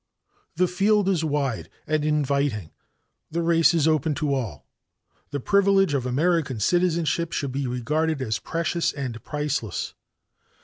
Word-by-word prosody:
"The 180 +3 +3
field 200 +3 +2
is 180 -4 +1
wide 140 -6 -1 0.2
and 155 -1 0
inviting, 140 - 0 0.6
the 170 +1 -2
race 165 -1 +4
is 165 -3 +2
open 155 -1 +2
to 145 0 0
all. 115 - -4 0.6
The 145 - -3
privilege 195 +1 +3
of 130 -3 0
American 145 -2 +1
citizenship 170 - +1
should 140 -3 -2
be 135 0 -2
regarded 150 +6 -1
as 110 -5 -1
precious 170 +1 -1
and 125 -6 -5
priceless. 145 -8 -3
150 Hz, 135 wpm, -25 LUFS, 135-170 Hz, 0.6 s, race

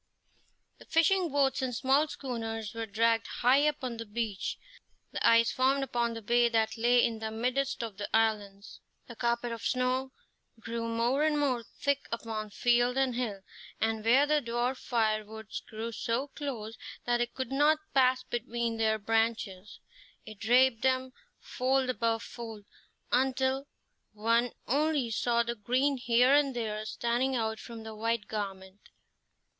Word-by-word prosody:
The - - -14
fishing 350 +2 +3
boats 275 -1 +2
and 255 -2 -2
small 275 +5 +3
schooners 225 -6 -5
were 230 0 -4
dragged 225 +2 +2
high 270 +5 +3
up 300 -2 -2
on 245 -2 -3
the 230 - -6
beach. 210 -2 -3 0.5
The - - -4
ice 230 0 +5
formed 270 +2 +2
upon 235 -3 -1
the 225 - -7
bay 240 +2 +3
that 225 -1 +1
lay 240 +1 +4
in 225 -1 -2
the 220 0 -3
midst 250 +4 -1
of 220 -4 -6
the 205 - -5
islands. 210 -3 -1 0.2
The 235 - -10
carpet 235 0 -1
of 230 - -5
snow 255 +1 0 0.5
grew 230 +1 -4
more 235 +5 +1
and 305 -1 +2
more 260 -5 +1
thick 280 +4 -2
upon 220 -2 -4
field 245 +3 +2
and 265 -2 +2
hill, 230 -5 -3 0.4
and 220 -1 0
where 255 +6 +5
the 300 0 +2
dwarf 240 +2 -1
firwoods 220 -2 -2
grew 225 +1 -5
so 235 +5 -2
close 235 -7 -5 0.3
that 240 0 +1
it 240 0 -2
could 260 -1 -4
not 295 +3 +4 0.2
pass 255 -1 +4
between 235 -1 -3
their 220 -1 +2
branches, 220 -3 -1 0.5
it 215 -2 -11
draped 245 +1 +4
them, 260 0 +1 0.2
fold 260 0 0
above 230 -2 -1
fold, 225 -3 -8 0.5
until 265 +2 +1 0.5
one 230 +3 +2 0.2
only 285 -2 +1
saw 235 +1 +1
the 235 0 -2
green 255 +6 +1
here 245 +2 +4
and 285 -3 +3
there 215 -2 -3
standing 240 +4 0
out 220 -2 -1
from 230 -1 -9
the 220 0 -7
white 230 0 -1
garment. 195 -2 -6
235 Hz, 155 wpm, -30 LUFS, 225-260 Hz, 0.5 s, ice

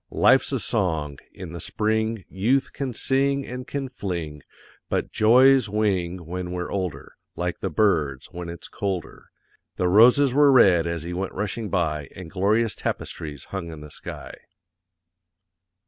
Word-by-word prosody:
LIFE'S - - +4
A - - +1
SONG; 75 -6 -1
in 90 -3 -9
the 85 - -6
SPRING 110 +2 -1
YOUTH 120 +9 0
can 135 -2 -3
SING 135 +3 +1
and 125 +1 -7
can 140 -1 -3
FLING; 85 - -5 0.5
BUT - - -1
JOYS 125 +2 +5
WING 95 -4 -1
WHEN 90 +1 -5
WE'RE 90 -1 -4
OLDER, 90 -8 -4 0.2
LIKE 90 0 -3
THE - - -2
BIRDS 75 -11 +1
when 90 -1 -6
it's 85 -1 -7
COLDER. 95 -5 -4 0.5
_The 90 - +1
roses 125 +6 +6
were 145 0 +6
red 90 -10 +5
as 85 -2 -3
he 85 +1 -5
went 95 +2 -3
rushing 105 +2 -3
by, 75 -6 -1
and 90 -4 -9
glorious 105 +4 +1
tapestries 75 -4 -5
hung 90 -4 -4
in 80 -2 -9
the 75 0 -11
sky. - - -8
95 Hz, 150 wpm, -24 LUFS, 85-115 Hz, 0.5 s, roses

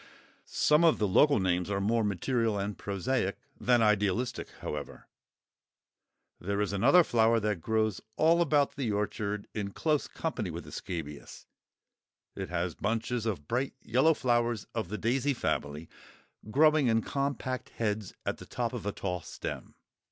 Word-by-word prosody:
Some 150 +2 +3
of 165 -2 +5
the 105 - +1
local 140 +8 +5
names 90 0 0
are 100 -1 0
more 110 +3 +1
material 110 +2 0
and 100 +1 -2
prosaic 100 +1 -1 0.2
than 120 -2 +3
idealistic, 105 +3 +1
however. 75 -1 -6 1.3
There 100 +3 -2
is 105 -1 0
another 135 - +6
flower 115 -4 +3
that 105 -5 -1
grows 110 0 0 0.2
all 165 +2 +4
about 145 -3 +2
the 125 -6 -1
orchard, 105 0 -2
in 100 -2 -4
close 155 -3 0
company 125 - -3
with 85 +1 -6
the - - -12
scabious; 75 -5 -7 0.9
it - - -5
has 90 -1 -1
bunches 115 +1 -2
of 85 -10 -3
bright 130 +3 -1
yellow 135 +8 +3
flowers 120 -4 +1
of 110 -7 -3
the 105 - -3
daisy 135 +5 +1
family, 75 -6 -2 0.6
growing 155 +3 +4
in 115 -1 +2
compact 140 -2 -2
heads 105 -3 -3
at - - -1
the - - -12
top 120 0 -2
of 115 -5 -5
a - - +1
tall 90 -3 -3
stem. - - -7
110 Hz, 150 wpm, -30 LUFS, 100-130 Hz, 1.3 s, another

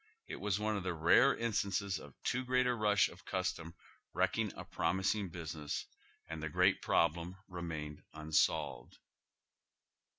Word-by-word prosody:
It - - -5
was 105 0 -1
one 110 0 0
of 100 - -2
the 90 -1 -2
rare 85 +12 +5
instances 100 -4 0
of - - -12
too 125 +1 0
great 125 0 +2
a 125 - +3
rush 105 -3 +3
of - - -14
custom 85 -2 -3 0.4
wrecking - - +1
a - - -7
promising 95 +1 0
business, 80 -3 -4 0.4
and 80 -1 -5
the 80 - -3
great - - +3
problem 85 +2 +1
remained 80 -5 -5
unsolved. 75 -5 0
90 Hz, 140 wpm, -35 LUFS, 80-105 Hz, 0.4 s, rare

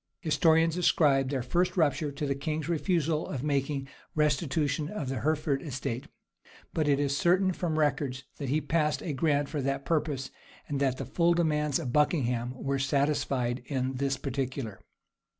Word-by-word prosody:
Historians 160 0 +3
ascribe 140 -6 +3
their 135 -3 -1
first 175 +9 0
rupture 150 -2 +2
to 140 +1 -4
the 140 - +1
king's 155 +3 -3
refusal 165 -2 0
of 135 -3 -4
making 140 -1 -1 0.3
restitution 150 0 +1
of 160 -10 -4
the 135 -2 -2
Hereford 150 -2 0
estate; 130 -4 -4 0.7
but 155 -2 +1
it 140 -1 +3
is 140 -1 +1
certain 185 +4 +3
from 165 -3 -2
records, 140 -3 0
that 140 -3 -4
he 150 +4 +2
passed 150 0 0
a 155 - -2
grant 145 +1 +1
for 145 0 -3
that 135 +1 -2
purpose, 150 -5 -1 0.4
and 145 -2 -2
that 135 -2 +1
the - - -4
full 170 0 +2
demands 150 -4 +1
of 125 - -4
Buckingham 125 -5 +1
were 135 +1 -2
satisfied 135 -3 0
in 130 -2 -1
this 135 0 0
particular. 130 -6 -3
145 Hz, 165 wpm, -29 LUFS, 135-155 Hz, 0.7 s, Historians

